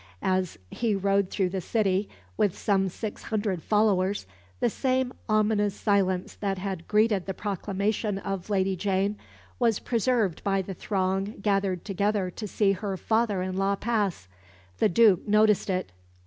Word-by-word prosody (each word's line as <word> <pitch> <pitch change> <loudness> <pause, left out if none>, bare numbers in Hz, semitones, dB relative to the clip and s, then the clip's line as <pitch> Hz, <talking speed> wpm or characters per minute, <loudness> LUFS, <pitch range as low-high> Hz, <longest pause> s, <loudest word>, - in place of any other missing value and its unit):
As 185 -2 0
he 225 -3 0
rode 195 0 +1
through 190 -3 0
the 190 0 -3
city, 200 0 0 0.3
with 200 - +1
some 195 -2 +1
six 210 +3 -6
hundred 205 -5 -2
followers, 205 - +2 0.3
the - - +2
same 260 +1 0 0.2
ominous 210 -1 +2
silence 190 -3 +1
that 195 -2 -2
had 185 -3 -5
greeted 210 -3 +2
the 190 - -3
proclamation 200 +1 -2
of 195 -1 -4
Lady 190 -1 +1
Jane 195 +2 0 0.4
was 230 -4 +3
preserved 230 -6 0
by 195 -1 +1
the 195 - -6
throng 195 +2 -1
gathered 195 -4 0
together 200 -1 0
to 210 +3 -6
see 200 0 +2
her 195 -1 -3
father 220 -3 +1
in 185 0 -3
law 195 +1 +2
pass. 205 - -1 0.5
The - - +4
Duke 205 0 +4
noticed 210 -1 +3
it. 185 - -1
200 Hz, 150 wpm, -27 LUFS, 190-215 Hz, 0.5 s, The